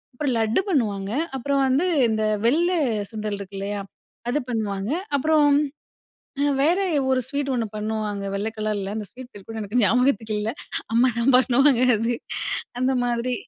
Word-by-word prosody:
அப்புறம் 280 -1 -1
லட்டு 220 +9 +2
பண்ணுவாங்க. 205 - 0 0.3
அப்புறம் 280 +2 0
வந்து 285 +8 +2 0.2
இந்த 220 0 0 0.2
வெள்ள 330 +8 +3 0.4
சுண்டல் 215 -2 -3
இருக்கு 195 0 -8
இல்லையா? 200 0 -3 0.5
அது 295 +4 +1
பண்ணுவாங்க. 210 -1 -2 0.3
அப்புறம், 295 -1 +4 1.1
வேற 335 +5 +4 0.3
ஒரு 260 -1 +3
அ - - -6
ஸ்வீட் 280 0 -2
ஒண்ணு 230 -2 0
பண்ணுவாங்க. 210 -1 -3
வெள்ள 205 +2 -1
கலர்ல 205 -2 -2
அந்த 210 -2 -4
ஸ்வீட் 255 0 -11
பேர் 200 -2 -12
கூட 225 - -6
எனக்கு 210 +5 0
ஞாபகத்துக்கு 225 -1 +2
இல்ல, 215 - -1 0.4
அம்மா 240 +3 +5
தான் 250 +2 +3
பண்ணுவாங்க 260 0 +4 0.2
அது. 230 +2 0 0.7
அந்த 260 +1 +2
மாதிரி. 240 +1 0
235 Hz, 150 wpm, -23 LUFS, 210-265 Hz, 1.1 s, அம்மா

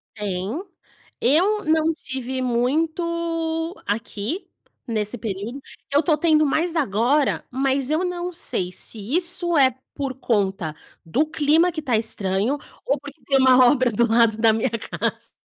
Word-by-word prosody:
Tem, 205 - -3 0.6
eu 375 - +3
não 315 +1 +2
tive 260 -3 -5
muito 325 +6 -1
aqui 220 - -3 0.4
nesse 220 -1 -2
período, 220 +5 -5 0.3
eu 285 +3 +3
tô 310 0 +3
tendo 310 -2 +3
mais 330 +4 0
agora, 265 +2 +1
mas 270 +1 0
eu 315 +4 +1
não 360 0 -3
sei 185 - -3
se 220 - -3 0.2
isso 345 -1 +2
é 260 -3 +5 0.2
por 275 -2 -3
conta 195 - -1 0.3
do 260 - +1
clima 315 +3 +2
que 315 - -4
tá 255 -6 +1
estranho 215 +4 0 0.3
ou 280 - +2
porque 285 0 -11
tem 275 -1 +3
uma 255 -1 +6
obra 255 -1 +3
do 235 +2 +2
lado 225 -1 +4
da 225 -1 +4
minha 225 +3 0
casa, 230 0 -4
270 Hz, 145 wpm, -22 LUFS, 225-320 Hz, 0.6 s, uma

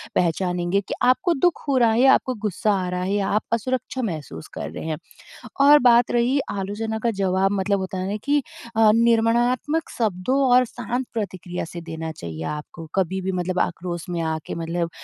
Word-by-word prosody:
पहचानेंगे 180 +2 +1
कि - - -3
आपको 255 +7 +3
दुःख 345 +4 +1
हो 280 - +2
रहा 235 -3 +4
है 225 - +1
या 270 0 +7
आपको 255 - +1
गुस्सा 210 0 0
आ 185 -2 -1
रहा 180 0 -2
है 190 - -2
या 200 -1 0
आप 210 +1 +2
असुरक्षा 255 +3 -2
महसूस 160 - -5
कर - - -5
रहे - - -7
हैं 160 -1 -2 0.6
और 290 +1 +8
बात 240 -2 +5
रही 240 +3 +2
आलोचना 210 +3 -3
का 235 - +2
जवाब 190 0 +2
मतलब 200 0 0
होता 190 0 -4
है 185 0 -2
ना 205 - -2
कि 290 +1 +2 0.4
अ, 220 -1 +6
निर्माणात्मक 235 +6 +2
शब्दों 220 +4 0
और 250 +1 +6
शांत 245 +2 -4
प्रतिक्रिया 185 -6 -4
से 170 +1 -8
देना 160 -1 -5
चाहिए 80 - -7
आपको। 150 +2 -7
कभी 190 0 0
भी 190 +1 -2
मतलब 180 0 -1
आक्रोश 175 -1 -2
में 175 -1 -2
आके 160 -1 -3
मतलब 170 +1 -2
200 Hz, 190 wpm, -23 LUFS, 175-240 Hz, 0.6 s, और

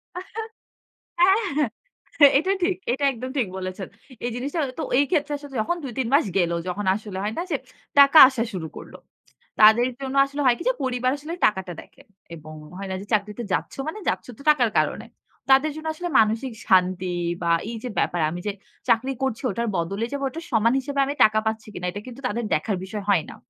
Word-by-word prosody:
আ - - -3 1.0
হ্যাঁ। 365 +2 +6 0.9
এহ - - +6 0.2
এটা 375 +5 0
ঠিক, 370 0 +2 0.2
এটা 275 +3 -2
একদম 255 +2 -6
ঠিক 235 -7 +1
বলেছেন। 185 0 -5 0.4
এই 240 - -1
জিনিসটা 280 +6 -3 0.2
তো - - -1
এই 285 - +4
ক্ষেত্রে 295 -3 +1
আসলে 285 -1 -12
যখন 345 +10 -1
২ 260 - -5
৩ 245 - 0
মাস 285 -3 +5
গেল, 170 -2 +2 0.2
যখন 190 +3 -3
আসলে 210 -3 -7
হয় 215 +1 -2
না - - 0
যে - - +2 0.4
টাকা 280 +3 +7
আসা 255 -4 -1
শুরু 165 -4 -4
করল। - - -11 0.7
তাদের 220 +4 +7
জন্য 270 0 -4
আসলে 285 +1 -5
হয় 245 -1 +5
কি - - -5
যে - - +2
পরিবার 255 0 0
আসলে 305 +4 -7
টাকাটা 190 -4 0
দেখে। - - -19 0.3
এবং 155 0 -11 0.2
হয় 195 -1 -6
না - - -2
যে - - -9
চাকরিতে 210 +2 -1
যাচ্ছ - - -2
মানে 375 +7 -5
যাচ্ছ - - -2
তো - - -14
টাকার 245 -6 +2
কারণে। - - -2 0.5
তাদের 280 +3 +5
জন্য 315 0 -6
আসলে 350 +1 -4
মানসিক 225 +3 +1
শান্তি 185 -1 +2 0.3
বা 170 - +1 0.2
এইযে 235 +2 -6
ব্যাপার 175 -2 0
আমি 175 - -5
যে - - +1 0.4
চাকরি 260 +4 +2
করছি 260 -2 -1
ওটার 235 0 -2
বদলে 195 +7 -2
যাবে 280 0 -3
ওটা 330 +5 -7
সমান 230 +2 +3
হিসেবে 280 +1 -4
আমি 285 - -2
টাকা 215 0 +2
পাচ্ছি 220 0 -3
কিনা 180 - -6
এটা 205 - -7
কিন্তু 255 +2 -10
তাদের 235 0 -3
দেখার 185 +5 -1
বিষয় 205 +1 -6
হয় 175 -6 +3
না। - - -10
235 Hz, 200 wpm, -24 LUFS, 200-280 Hz, 1.0 s, টাকা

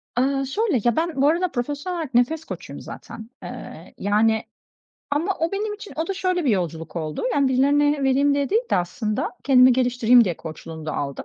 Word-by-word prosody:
Aaa, 270 +2 +1
şöyle: 340 - 0
Ya, 240 -2 +2
ben 330 0 -1
bu 280 - +5
arada 340 +3 +1
profesyonel 290 +8 -3
olarak 310 -6 -5
nefes 300 +7 +2
koçuyum - - -8
zaten. 225 0 -10
Eee, - - -9
yani, 220 +2 +2 0.7
ama 315 +7 +1
o 330 +2 -1
benim 415 +1 -2
için 420 0 -10
o 320 +1 -1
da 390 - -1
şöyle 365 -2 0
bir 265 - +3
yolculuk 165 -5 -2
oldu, 155 -2 -3
yani, 280 0 +2
birilerine 285 +2 +2
vereyim 275 +2 +3
diye 280 -1 0
değil 445 +4 +3
de - - +3
aslında 210 +5 -2
kendimi 255 -2 +6
geliştireyim 245 -1 +4
diye 175 -5 -2
koçluğunu 160 0 -9
da 155 - -2
aldım. 140 -1 -4
270 Hz, 190 wpm, -23 LUFS, 220-320 Hz, 0.7 s, kendimi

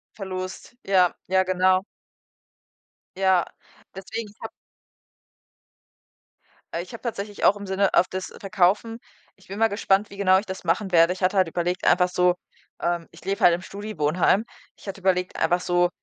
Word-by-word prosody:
Verlust, 185 +3 -7
ja, 185 -2 +3
ja, 190 0 +3
genau. 185 +1 +2 1.3
Ja, 190 -2 +3 0.5
deswegen 210 +4 -6
ich 205 - -22
habe - - -5 2.2
Äh, 170 - -1
ich 185 - -12
habe 230 - -9
tatsächlich 205 -3 -4
auch 205 - +5
im 205 - -8
Sinne 190 +1 0
auf 180 - +5
das 185 0 -5
Verkaufen 195 +4 +1 0.4
ich 190 - -23
bin 195 - -6
mal 225 0 +4
gespannt, 200 0 +1
wie 200 - -11
genau 190 -1 +4
ich 200 - -3
das 190 -1 -6
machen 185 +3 0
werde. 165 +1 +5
Ich 185 - -12
hatte 185 +2 +2
halt 185 -3 +3
überlegt, 175 +2 -2
einfach 180 0 +4
so, 180 0 +3 0.5
ähm 170 -1 -1
ich - - -17
lebe 195 +1 -2
halt 175 -1 +7
im 175 - -5
Studi-Wohnheim, 195 -1 0 0.3
ich - - -17
hatte 195 0 -6
überlegt 180 -1 0
einfach 175 +2 +2
so 175 0 +2
185 Hz, 170 wpm, -24 LUFS, 180-200 Hz, 2.2 s, halt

